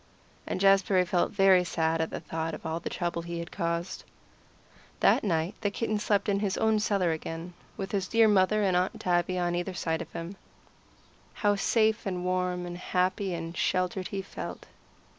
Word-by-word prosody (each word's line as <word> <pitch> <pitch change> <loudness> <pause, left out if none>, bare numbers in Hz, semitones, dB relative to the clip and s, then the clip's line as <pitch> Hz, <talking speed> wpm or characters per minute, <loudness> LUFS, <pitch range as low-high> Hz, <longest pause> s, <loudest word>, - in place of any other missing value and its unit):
And - - -2
Jazbury 195 -1 +4
felt 175 0 +1
very 195 -2 +5
sad 165 -1 0
at 160 - -1
the - - -5
thought 160 0 -4
of - - -12
all 160 +1 -2
the - - -5
trouble 175 -1 -2
he 170 0 -5
had 170 +1 -6
caused. 170 0 -3 1.0
That - - +4
night 170 -1 0
the 205 - +1
kitten 215 +1 -2
slept 205 0 +1
in 200 -1 +2
his 200 -2 -1
own 220 -1 +2
cellar 195 -5 +1
again, 165 +2 -5 0.2
with 195 -2 -4
his 195 -3 -1
dear 225 +1 +5
mother 210 +1 +3
and 190 -2 +2
Aunt 180 +1 0
Tabby, 175 0 +1
one 180 - 0
on 175 0 0
either 180 +1 -3
side 160 -2 -1
of 170 - -8
him. 170 +4 -6 1.1
How 205 0 +5
safe 220 +1 +2
and 180 -2 -3
warm 180 -1 -1
and 175 0 -6
happy 185 +1 0
and 165 0 -6
sheltered 185 +1 0
he 195 -1 -4
felt. - - -7
185 Hz, 190 wpm, -28 LUFS, 170-200 Hz, 1.1 s, very